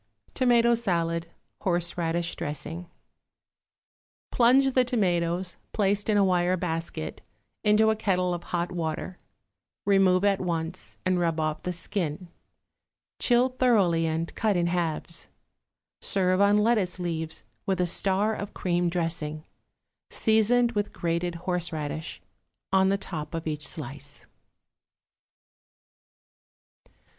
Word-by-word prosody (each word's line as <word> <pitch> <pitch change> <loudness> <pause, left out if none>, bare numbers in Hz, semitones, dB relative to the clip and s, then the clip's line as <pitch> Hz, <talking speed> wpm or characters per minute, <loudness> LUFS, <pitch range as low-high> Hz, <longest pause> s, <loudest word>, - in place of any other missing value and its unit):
=Tomato 240 -2 +4
Salad, 170 -7 0 0.3
Horseradish 170 -1 -1
Dressing.= 165 +4 -5 1.4
Plunge 260 +3 +5
the 255 - +5
tomatoes, 180 -6 0 0.2
placed 205 0 +1
in 210 - +3
a 200 - +5
wire 180 0 +2
basket, 165 - -4 0.4
into 215 +1 +4
a - - 0
kettle 180 -4 0
of 175 - -5
hot 175 0 -2
water; 170 +1 -4 0.7
remove 195 -1 +4
at 200 -1 +2
once 170 0 -4
and 185 -1 +2
rub 165 -2 0
off 155 -1 -1
the 180 - -3
skin; 175 -1 -3 0.9
chill 245 +1 +4
thoroughly 200 -11 +2
and 160 +1 -2
cut 215 -4 +1
in 175 - +2
halves. 170 -1 -1 0.7
Serve 185 -1 +3
on 200 +1 +5
lettuce 210 -5 +2
leaves 160 -6 -4 0.2
with 190 -1 0
a 180 - +3
star 195 +4 +1
of 205 -1 -6
cream 175 -1 0
dressing, 165 -3 -2 0.6
seasoned 230 +2 +3
with 205 -2 -2
grated 170 +1 -1
horseradish, 165 -3 -3 0.5
on 190 0 +5
the 195 - +2
top 165 -5 -6
of 165 - -4
each 150 -2 -2
slice. 140 -1 -7
180 Hz, 115 wpm, -27 LUFS, 165-205 Hz, 1.4 s, Plunge